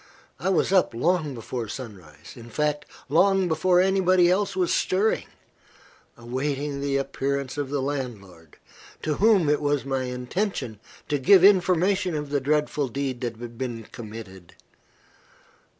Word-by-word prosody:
I 175 Hz, +7 st, -1 dB
was 190 Hz, +1 st, +1 dB
up 185 Hz, -10 st, +3 dB
long 155 Hz, +1 st, 0 dB
before 115 Hz, 0 st, -5 dB
sunrise 95 Hz, -, -10 dB
in 120 Hz, -1 st, -12 dB
fact, 150 Hz, +2 st, -1 dB, 0.2 s
long 190 Hz, +5 st, +3 dB
before 175 Hz, +2 st, +2 dB
anybody 185 Hz, -1 st, +4 dB
else 195 Hz, +1 st, 0 dB
was 180 Hz, -2 st, +1 dB
stirring 200 Hz, +4 st, +1 dB, 0.9 s
awaiting 140 Hz, +4 st, -3 dB
the 140 Hz, -1 st, 0 dB
appearance 135 Hz, -1 st, -2 dB
of 145 Hz, -2 st, -3 dB
the 140 Hz, -1 st, -1 dB
landlord, 105 Hz, -, -6 dB, 0.5 s
to 150 Hz, -2 st, -1 dB
whom 205 Hz, -5 st, +4 dB
it 150 Hz, 0 st, +2 dB
was 145 Hz, -2 st, 0 dB
my 135 Hz, -1 st, -1 dB
intention 125 Hz, -, -3 dB, 0.3 s
to 145 Hz, -, 0 dB
give 185 Hz, +7 st, +6 dB
information 185 Hz, -1 st, +3 dB
of 150 Hz, -1 st, -4 dB
the 145 Hz, -1 st, +1 dB
dreadful 150 Hz, 0 st, 0 dB
deed 130 Hz, 0 st, -4 dB
that 120 Hz, -3 st, -4 dB
had 120 Hz, 0 st, -9 dB
been 120 Hz, -3 st, -4 dB
committed. 105 Hz, -6 st, -10 dB
140 Hz, 140 wpm, -25 LUFS, 125-180 Hz, 0.9 s, give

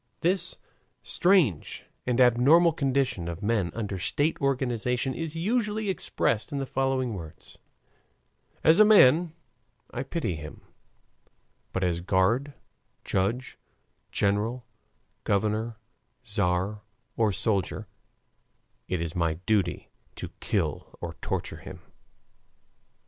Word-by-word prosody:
This 180 Hz, +1 st, +1 dB, 0.5 s
strange 175 Hz, -, +2 dB, 0.2 s
and 125 Hz, 0 st, +1 dB
abnormal 135 Hz, +8 st, +6 dB
condition 135 Hz, -, 0 dB
of 85 Hz, +4 st, -5 dB
men 105 Hz, -5 st, +1 dB
under 105 Hz, -4 st, -3 dB
state 145 Hz, -, 0 dB
organization 125 Hz, -1 st, 0 dB
is 165 Hz, +1 st, -4 dB
usually 210 Hz, +2 st, 0 dB
expressed 115 Hz, -, -1 dB
in 145 Hz, -, -2 dB
the 135 Hz, -, -1 dB
following 130 Hz, -2 st, 0 dB
words: 80 Hz, -5 st, -10 dB, 1.0 s
"As 160 Hz, +4 st, +6 dB
a -, -, +10 dB
man, 175 Hz, -6 st, +6 dB, 0.6 s
I 120 Hz, -, -3 dB
pity 135 Hz, -, -2 dB
him; 75 Hz, -1 st, -8 dB, 1.1 s
but 95 Hz, -, -2 dB
as 85 Hz, -1 st, 0 dB
guard, 105 Hz, +10 st, +1 dB, 0.5 s
judge, 110 Hz, +7 st, -1 dB, 0.5 s
general, 105 Hz, +5 st, 0 dB, 0.6 s
governor, 110 Hz, +2 st, 0 dB, 0.5 s
tzar, 100 Hz, -2 st, -1 dB, 0.3 s
or 110 Hz, -2 st, +2 dB
soldier, 100 Hz, 0 st, -1 dB, 1.0 s
it 90 Hz, -2 st, -1 dB
is 85 Hz, -1 st, -5 dB
my 85 Hz, -2 st, +1 dB
duty 100 Hz, -5 st, 0 dB, 0.2 s
to -, -, -6 dB
kill -, -, -2 dB
or -, -, -5 dB
torture -, -, -3 dB
him." -, -, -10 dB
120 Hz, 105 wpm, -27 LUFS, 100-145 Hz, 1.1 s, a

